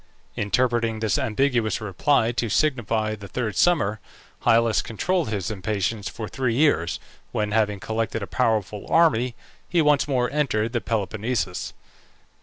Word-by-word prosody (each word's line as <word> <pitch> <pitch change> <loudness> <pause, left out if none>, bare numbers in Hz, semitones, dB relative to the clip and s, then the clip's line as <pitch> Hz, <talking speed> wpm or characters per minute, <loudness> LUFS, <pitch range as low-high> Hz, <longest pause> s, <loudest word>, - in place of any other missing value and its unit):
Interpreting 115 +1 +1
this 110 +5 +1
ambiguous 120 -2 +1
reply 110 +4 +1
to 120 -1 -2
signify 115 -6 +1
the 100 -2 -8
third 110 -1 -3
summer, 145 - +2 0.5
Hyllus 115 -1 +4
controlled 170 - -1
his 100 -2 -2
impatience 100 +1 -2
for 110 - -6
three 130 -1 -1
years, 85 - +2 0.3
when, 105 -1 -1
having 105 -2 +1
collected 110 +1 -2
a - - -2
powerful 105 -2 -1
army, 125 -8 +3 0.3
he 175 - +2
once 150 -2 +3
more 125 -3 +1
entered 120 -6 0
the 120 - 0
Peloponnesus. 110 -2 -2
115 Hz, 135 wpm, -24 LUFS, 105-130 Hz, 0.5 s, Hyllus